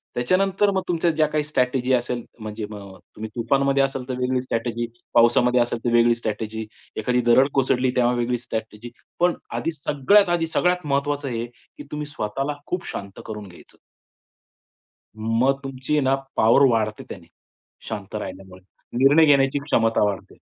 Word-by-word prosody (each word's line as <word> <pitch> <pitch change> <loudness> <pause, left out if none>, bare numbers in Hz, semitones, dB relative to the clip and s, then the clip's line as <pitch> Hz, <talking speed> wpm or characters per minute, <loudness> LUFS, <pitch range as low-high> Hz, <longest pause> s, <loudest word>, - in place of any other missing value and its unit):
त्याच्यानंतर 195 +10 +2
मग 190 - 0
तुमच्या 170 -1 +1
ज्या 155 -1 +2
काही 150 0 -1
स्ट्रॅटेजी 130 -3 0
असेल, 120 -1 -1 0.2
म्हणजे 110 0 -5
मग 105 -1 -8
अ, - - -17 0.2
तुम्ही 110 +1 -6
तुफानमध्ये 135 +3 +2
असेल 135 -2 -3
तर 130 - -2
वेगळी 125 0 0
स्ट्रॅटेजी, 120 -1 -2 0.3
पावसामध्ये 120 +1 +4
असेल 120 0 -1
तर 120 - +1
वेगळी 120 0 +5
स्ट्रॅटेजी, 110 -1 -4 0.3
एखादी 125 +3 +1
दरड 130 +3 +5
कोसळली 130 -1 +2
तेव्हा 125 -1 +3
वेगळी 120 0 0
स्ट्रॅटेजी. 110 -1 -6 0.3
पण 175 0 +3 0.2
आधी 165 - -1
सगळ्यात 160 +8 +3
आधी 170 -1 +1
सगळ्यात 180 -1 +1
महत्वाचं 140 0 -1
हे, 115 -1 -3
की 120 0 -15
तुम्ही 150 0 -4
स्वतःला 135 +2 -3
खूप 180 -1 -3
शांत 100 -1 -7
करून 105 -2 -7
घ्यायचं. 90 - -16 1.4
मग 115 +5 +1
तुमची 135 +1 -4
आहे 150 - +3
ना 135 +1 +3 0.2
पॉवर 115 +5 +5
वाढते 110 -2 0
त्याने 90 -4 -9 0.6
शांत 105 -2 -6
राहिल्यामुळे, 95 -2 -7 0.4
निर्णय 140 +5 +6
घेण्याची 140 -1 +3
क्षमता 115 -7 +2
वाढते. 100 -2 -3
125 Hz, 160 wpm, -23 LUFS, 115-140 Hz, 1.4 s, निर्णय